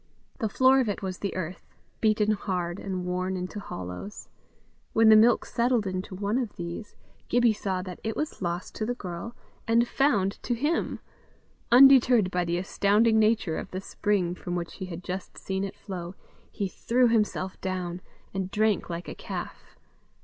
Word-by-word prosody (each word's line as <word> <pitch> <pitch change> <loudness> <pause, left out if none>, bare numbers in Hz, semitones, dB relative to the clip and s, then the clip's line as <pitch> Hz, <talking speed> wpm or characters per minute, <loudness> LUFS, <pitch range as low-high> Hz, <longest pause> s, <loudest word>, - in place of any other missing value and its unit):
The 220 -4 0
floor 260 +5 +5
of 245 -5 +1
it 205 - -3
was 185 -1 -4
the 200 - -3
earth, 180 -1 -6 0.2
beaten 215 -1 +3
hard, 180 -3 -2
and 185 -2 -4
worn 185 +1 -1
into 180 +3 -5
hollows. 95 - -7 0.6
When 225 0 +6
the 215 - +9
milk 225 +2 +5
settled 235 -2 +1
in 185 -1 -2
one 200 +5 -1
of 235 -5 -4
these, 175 +5 -6 0.3
Gibbie 240 -1 +4
saw 190 -3 -2
that 185 -1 -8
it 220 0 -2
was 305 -7 -4
lost 175 0 -3
to 215 - -1
the 245 - -1
girl, 185 +2 -6 0.3
and 230 +1 +4
found 210 -10 +1
to 240 - -1
him: 295 +8 -1 0.7
undeterred 250 -5 +7
by 180 -1 0
the 170 +1 0
astounding 210 +4 +3
nature 215 -6 +2
of - - -7
the 185 - -4
spring 195 -2 0
from 180 0 -5
which 170 -1 -4
he 190 - -5
had 180 -1 -7
just 185 +1 -6
seen 190 0 -3
it 195 - -5
flow, 180 -2 -7 0.4
he 200 - -2
threw 245 +6 +2
himself 210 -4 0
down, 180 -1 -3 0.3
and 190 -1 -2
drank 215 -1 +1
like 170 +1 -5
a - - -5
calf. - - -7
200 Hz, 175 wpm, -27 LUFS, 180-225 Hz, 0.7 s, the